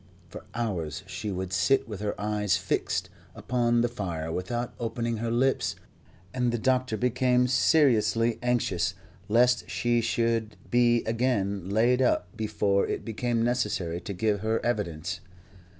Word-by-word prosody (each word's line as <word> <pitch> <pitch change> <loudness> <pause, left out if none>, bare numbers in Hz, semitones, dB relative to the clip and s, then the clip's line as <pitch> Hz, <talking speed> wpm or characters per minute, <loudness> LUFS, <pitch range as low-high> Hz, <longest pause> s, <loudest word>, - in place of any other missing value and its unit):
For - - -10
hours 90 -8 -3
she 95 +3 -5
would 95 0 -4
sit 95 +9 +2
with 105 -4 -6
her 105 -1 -3
eyes 105 -3 +1
fixed - - -2 0.2
upon 120 -1 +1
the 120 - +2
fire 85 -9 -4
without 120 +8 -3
opening 115 0 -2
her 115 +1 -2
lips, 130 +3 +1 0.6
and 125 -2 +1
the 120 - 0
doctor 130 -1 +1
became 125 +1 +2
seriously 120 -4 +3
anxious 95 -8 0 0.3
lest 125 +3 +3
she 120 0 +1
should 115 -1 0 0.2
be 120 -1 +4
again 100 -5 -1
laid 120 +5 +3
up 90 -8 +1
before 105 -2 +1
it - - -3
became 115 +1 -1
necessary 105 -8 -1
to - - -6
give 105 +2 0
her 110 +2 0
evidence. 90 -6 -2
115 Hz, 140 wpm, -27 LUFS, 100-120 Hz, 0.6 s, be